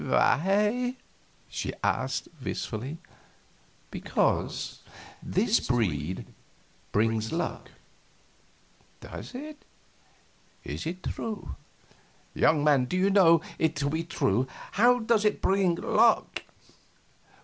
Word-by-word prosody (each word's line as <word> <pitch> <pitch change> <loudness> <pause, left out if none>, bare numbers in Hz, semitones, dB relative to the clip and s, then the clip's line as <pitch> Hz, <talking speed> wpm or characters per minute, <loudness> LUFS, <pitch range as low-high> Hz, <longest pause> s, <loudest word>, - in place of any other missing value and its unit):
"Why?" 210 - +2 0.5
she - - -4
asked, - - 0 0.2
wistfully. 130 +8 -4 0.9
"Because - - -1 0.4
this 210 +5 +2
breed 95 - -1 0.7
brings 110 +1 +1
luck." 170 +2 -3 1.3
"Does - - -9
it? 300 +3 -8 1.0
Is - - -5
it 180 +3 -5
true? 220 -2 -4 0.8
Young 150 -2 +3
man, 145 -4 +4
do 180 - -2
you 195 +2 +3
know 170 -5 +6 0.2
it 160 -1 +1
to 140 0 -1
be 160 +1 -1
true? 130 - 0 0.2
How 245 +4 +5
does 225 -2 +2
it 210 -1 +2
bring 190 -3 +2
luck?" 225 +6 +2
170 Hz, 95 wpm, -28 LUFS, 130-210 Hz, 1.3 s, know